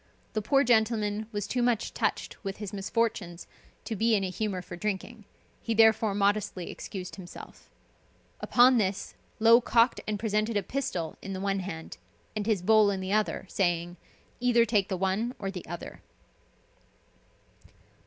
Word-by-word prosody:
The 215 Hz, -, 0 dB
poor 275 Hz, +7 st, +3 dB
gentleman 220 Hz, -3 st, +1 dB
was 205 Hz, -2 st, -3 dB
too 250 Hz, -, -1 dB
much 240 Hz, -2 st, +1 dB
touched -, -, -2 dB
with 195 Hz, -1 st, -4 dB
his 210 Hz, -1 st, -6 dB
misfortunes 195 Hz, -4 st, -2 dB, 0.4 s
to 225 Hz, -, -3 dB
be 225 Hz, +2 st, +3 dB
in 200 Hz, -, +1 dB
a 185 Hz, -, -2 dB
humor 185 Hz, -1 st, -3 dB
for 175 Hz, -, -8 dB
drinking, 210 Hz, +3 st, -4 dB, 0.4 s
he 230 Hz, -, -2 dB
therefore 220 Hz, -2 st, +4 dB
modestly 200 Hz, -3 st, 0 dB
excused 185 Hz, -1 st, -7 dB
himself. 175 Hz, -2 st, -11 dB, 0.7 s
Upon 245 Hz, 0 st, +5 dB
this 195 Hz, -1 st, -2 dB, 0.3 s
Low 230 Hz, +2 st, +7 dB
cocked 235 Hz, 0 st, +3 dB
and 215 Hz, -1 st, -1 dB
presented 215 Hz, +1 st, 0 dB
a 200 Hz, -, 0 dB
pistol 180 Hz, -, -3 dB
in 195 Hz, -, -6 dB
the 190 Hz, -, -4 dB
one 195 Hz, 0 st, 0 dB
hand, 160 Hz, -, -7 dB, 0.4 s
and 210 Hz, 0 st, -2 dB
his 205 Hz, -5 st, +1 dB
bowl 215 Hz, +1 st, +5 dB
in 195 Hz, -1 st, -1 dB
the 190 Hz, +1 st, -3 dB
other, 215 Hz, -2 st, 0 dB
saying, 175 Hz, -2 st, 0 dB, 0.4 s
"Either 240 Hz, -1 st, +4 dB
take 210 Hz, -3 st, +1 dB
the 190 Hz, -, -1 dB
one 195 Hz, +6 st, -1 dB
or 195 Hz, -1 st, -4 dB
the 185 Hz, -2 st, -8 dB
other." 175 Hz, +1 st, -8 dB
210 Hz, 160 wpm, -28 LUFS, 190-225 Hz, 0.7 s, Low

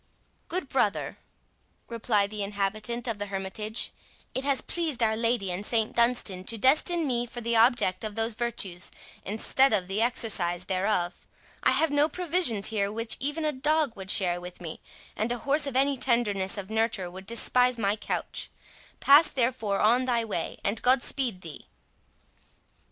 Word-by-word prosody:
"Good 345 Hz, -4 st, -3 dB
brother," 215 Hz, -6 st, -1 dB, 0.7 s
replied 215 Hz, -3 st, 0 dB
the 210 Hz, -1 st, -4 dB
inhabitant 210 Hz, +4 st, -3 dB
of 225 Hz, -3 st, -3 dB
the 205 Hz, -, -3 dB
hermitage, 200 Hz, +3 st, -4 dB, 0.4 s
"it 260 Hz, -, -2 dB
has 280 Hz, -2 st, +2 dB
pleased 315 Hz, -8 st, -2 dB
Our 220 Hz, -1 st, +2 dB
Lady 230 Hz, -4 st, 0 dB
and 180 Hz, +3 st, -4 dB
St 220 Hz, 0 st, 0 dB
Dunstan 235 Hz, -6 st, +1 dB
to 230 Hz, -, 0 dB
destine 310 Hz, -, +3 dB
me 245 Hz, -3 st, -1 dB
for 240 Hz, -, -8 dB
the 235 Hz, 0 st, -1 dB
object 225 Hz, -5 st, +3 dB
of 215 Hz, -1 st, -5 dB
those 225 Hz, +1 st, 0 dB
virtues, 205 Hz, -6 st, -2 dB, 0.3 s
instead 225 Hz, +5 st, +2 dB
of 190 Hz, -4 st, 0 dB
the 195 Hz, +3 st, -1 dB
exercise 195 Hz, -7 st, +2 dB
thereof. 185 Hz, -1 st, -1 dB, 0.3 s
I -, -, +3 dB
have 320 Hz, -2 st, +2 dB
no 290 Hz, +2 st, +3 dB
provisions 340 Hz, -, +1 dB
here 200 Hz, -2 st, -1 dB
which 230 Hz, +1 st, -1 dB
even 295 Hz, +4 st, -2 dB
a 305 Hz, -, +1 dB
dog 295 Hz, -1 st, +1 dB
would 190 Hz, -2 st, -9 dB
share 175 Hz, -3 st, +2 dB
with 180 Hz, 0 st, -10 dB
me, 165 Hz, -3 st, -8 dB, 0.3 s
and 220 Hz, +3 st, -2 dB
a 245 Hz, -, -1 dB
horse 285 Hz, +4 st, 0 dB
of 275 Hz, -, -5 dB
any 275 Hz, +1 st, +3 dB
tenderness 210 Hz, -7 st, +1 dB
of 200 Hz, +1 st, -7 dB
nurture 220 Hz, -5 st, 0 dB
would 190 Hz, +1 st, -11 dB
despise 250 Hz, +2 st, +3 dB
my 205 Hz, -2 st, 0 dB
couch—pass 285 Hz, +7 st, +1 dB
therefore 235 Hz, -5 st, -1 dB
on 240 Hz, +4 st, +3 dB
thy 235 Hz, -2 st, 0 dB
way, 185 Hz, -6 st, -4 dB
and 205 Hz, +3 st, -1 dB
God 250 Hz, 0 st, +3 dB
speed 240 Hz, -9 st, -1 dB
thee." 165 Hz, -4 st, -10 dB
225 Hz, 165 wpm, -27 LUFS, 200-255 Hz, 0.7 s, destine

